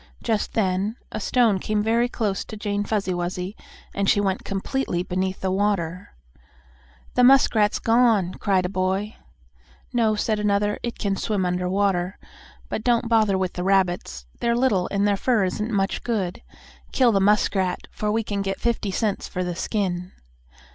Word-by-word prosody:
Just 220 -3 -1
then 195 +1 0 0.2
a - - -4
stone 220 -2 +2
came 210 +2 -1
very 230 +2 +2
close 210 -5 -2
to 215 - -8
Jane 205 -1 -2
Fuzzy 205 -3 -1
Wuzzy, 180 +3 -3 0.4
and 200 -1 0
she - - +4
went 195 -2 -1
completely 195 -2 -2
beneath 185 +1 -2
the 190 - 0
water. 190 -2 -1 1.0
"The 250 - +3
muskrat's 245 -5 +5
gone!" 225 -6 +3
cried 190 -2 +1
a - - -1 0.2
boy. 200 +3 -2 0.8
"No," 225 -3 +2
said 215 0 0
another, 205 0 +1
"it 235 - -4
can 200 -2 -1
swim 205 -3 -1
under 180 0 -1
water. 190 -1 0 0.5
But 215 - -4
don't 235 -1 +2
bother 215 -4 +3
with 185 -1 -1
the 180 - -4
rabbits. 180 - 0
They're 235 0 +1
little, 215 -8 +2
and 200 0 +1
their 200 -1 +2
fur 235 -1 +2
isn't 210 +4 -2
much 195 -2 -1
good. 200 -7 -2 0.5
Kill 250 -3 +4
the 200 - +2
muskrat, 195 -2 +2
for 210 0 -2
we 225 +1 0
can 205 -1 -3
get 195 0 -3
fifty 235 -3 -1
cents 205 +1 -1
for 185 - -3
the 175 -1 -3
skin." 185 -2 -2
200 Hz, 170 wpm, -24 LUFS, 185-220 Hz, 1.0 s, muskrat's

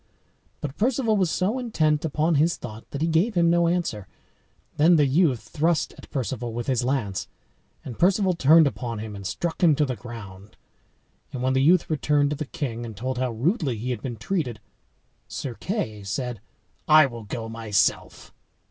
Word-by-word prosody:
But 145 -1 -5
Perceval 230 -1 +1
was 185 -4 +2
so 205 +10 0
intent 155 -11 +1
upon 160 +1 +1
his 160 +3 +2
thought 110 -2 -9
that 145 +2 -3
he - - +2
gave 170 +7 +1
him 170 -1 +4
no 170 0 +3
answer. 170 - -1 0.7
Then 165 +4 +6
the 150 -3 +4
youth 135 -6 +1
thrust 160 +1 0
at - - -14
Perceval 125 -3 -3
with 120 0 -4
his 130 -3 0
lance; 110 -8 -1 0.6
and 120 -4 -8
Perceval 190 +1 +3
turned 160 0 +6
upon 120 -4 -3
him, 105 -1 -6
and 100 -1 -6
struck 170 - -3
him 165 -4 +5
to 150 - +2
the 130 -2 -3
ground. 105 -3 -11 0.7
And 130 -3 -5
when 130 0 +2
the 130 - +2
youth 170 +5 +4
returned 145 -1 +1
to - - 0
the 155 - -4
king, 120 -6 -4
and 110 -4 -8
told 130 +3 -3
how 130 -1 0
rudely 130 - 0
he 125 +4 -3
had 120 -4 -4
been 120 -4 -5
treated, 125 - -2 0.7
Sir 130 - -5
Kay 115 - -4
said, 115 +2 -4 0.5
"I 155 0 +8
will 120 -4 -7
go 115 +2 -5
myself." 115 -2 -1
135 Hz, 185 wpm, -25 LUFS, 115-165 Hz, 0.7 s, I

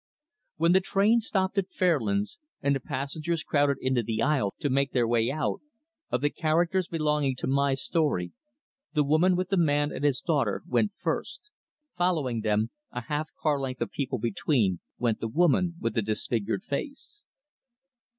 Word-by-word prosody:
When 165 +2 +3
the 190 - +6
train 200 +5 +3
stopped 195 -3 0
at 190 -1 -3
Fairlands, 200 - 0 0.2
and 140 0 +1
the - - -1
passengers 155 +6 -3
crowded 145 -2 +2
into 130 -2 +1
the 110 0 -3
aisle 135 -10 +1
to - - -1
make 140 0 +1
their 120 -3 +2
way 115 0 +2
out, 155 - -2 0.5
of 125 - 0
the 145 0 +1
characters 170 +3 +1
belonging 150 -4 0
to - - -4
my 140 0 +2
story, 135 - 0 0.6
the 150 - +4
woman 155 +6 +3
with 185 0 -1
the 195 - +1
man 145 -3 +2
and - - -5
his 140 -3 +2
daughter 140 - 0
went 205 +3 +1
first. 420 - -3 0.5
Following 155 -10 +1
them, 110 +1 +1 0.2
a 125 - -4
half 150 +6 -3
car 150 -3 +1
length 130 -2 -4
of 120 - -2
people 135 -2 -2
between, 110 - +1 0.2
went 115 -3 0
the 115 - -2
woman 170 +6 +2
with 115 -1 -1
the 115 - +1
disfigured 110 - -2
face. 300 - -6
145 Hz, 170 wpm, -27 LUFS, 125-175 Hz, 0.6 s, the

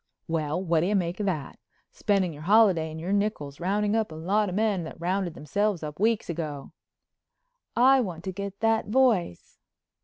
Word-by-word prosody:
"Well, 155 -1 -1
what 170 -3 +1
do 170 - +1
you 210 - +1
make 175 -1 -1
of 205 - -1
that? 155 -7 -3 0.3
Spending 200 - 0
your 145 - -11
holiday 190 -3 +4
and 160 +1 -7
your 180 +5 -2
nickels 200 -9 -2
rounding 205 +4 0
up 220 -5 0
a - - -8
lot 195 +6 0
of 180 - -4
men 210 -4 +1
that 160 - -9
rounded 180 0 -1
themselves 195 +4 -1
up 150 +1 -6
weeks 220 +1 +1
ago." 155 -5 -5 1.0
"I 260 +2 +5
want 175 -7 -5
to 190 - -3
get 200 +1 -6
that 225 -1 +2
voice." 215 - +1
190 Hz, 185 wpm, -26 LUFS, 160-210 Hz, 1.0 s, I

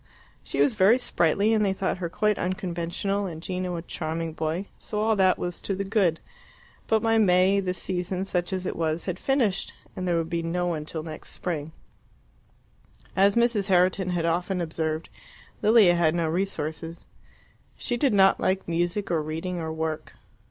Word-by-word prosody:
She - - -4
was 270 - +4
very 210 +3 +5
sprightly, 205 -2 +2
and 215 -1 +3
they 195 -2 +2
thought 190 -1 -2
her 170 -2 -3
quite 210 +3 +1
unconventional, 185 +2 -2
and 160 -3 -6
Gino 180 +1 -3
a 165 - -5
charming 165 -1 -4
boy, 160 +4 -2
so 210 - -4
all 220 +1 +2
that 190 -2 +4
was 175 -1 -4
to 195 - -2
the 195 - -2
good. 195 -5 +1 0.7
But 220 -1 +3
by 225 0 +3
May 190 0 +4
the 185 -2 -2
season, 185 0 -3
such 180 -1 -1
as 185 -1 -2
it - - -2
was, 160 0 -1
had 185 0 -3
finished, 240 -8 0 0.2
and 185 -1 -3
there 175 -1 +2
would 165 -1 -1
be 170 0 -2
no 175 +2 -1
one 160 -4 -2
till 155 0 -5
next 155 -1 -8
spring. 160 -3 -4 1.4
As 195 +1 +4
Mrs. 235 -4 +2
Herriton 185 0 +3
had 175 -2 0
often 180 +3 0
observed, 160 -1 -2 0.5
Lilia 215 -5 +6
had 170 -2 +2
no 170 -2 +1
resources. 165 -2 -3 0.7
She 245 - -1
did 260 +2 +2
not 195 -2 +5
like 190 +1 0
music, 175 +4 -1
or 165 -2 +2
reading, 165 +4 -4
or 160 -1 -3
work. 160 -1 -4
180 Hz, 180 wpm, -26 LUFS, 165-195 Hz, 1.4 s, Lilia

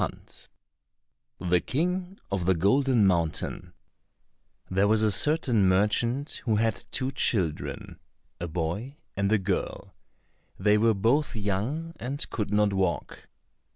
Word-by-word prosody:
92 90 - -11
The 90 - +5
King 180 +6 -2
of 95 -3 -1
the 95 - +4
Golden 120 - +3
Mountain 85 -4 -1 1.0
There 95 +2 +2
was 110 +1 +3
a 110 - +3
certain 120 - +3
merchant 115 +9 +1
who 110 -3 +2
had 115 +2 0
two 130 +3 -1
children, 90 - -1 0.4
a 85 - -3
boy 85 - -3 0.2
and 100 +1 0
a 110 - +5
girl; 95 -1 -3 0.6
they 105 +2 +3
were 115 0 +3
both 120 +10 +1
young, 110 +12 -2
and 135 +3 -4
could 105 -2 -3
not 105 -1 +2
walk. 95 -3 -2
105 Hz, 125 wpm, -27 LUFS, 95-130 Hz, 1.0 s, The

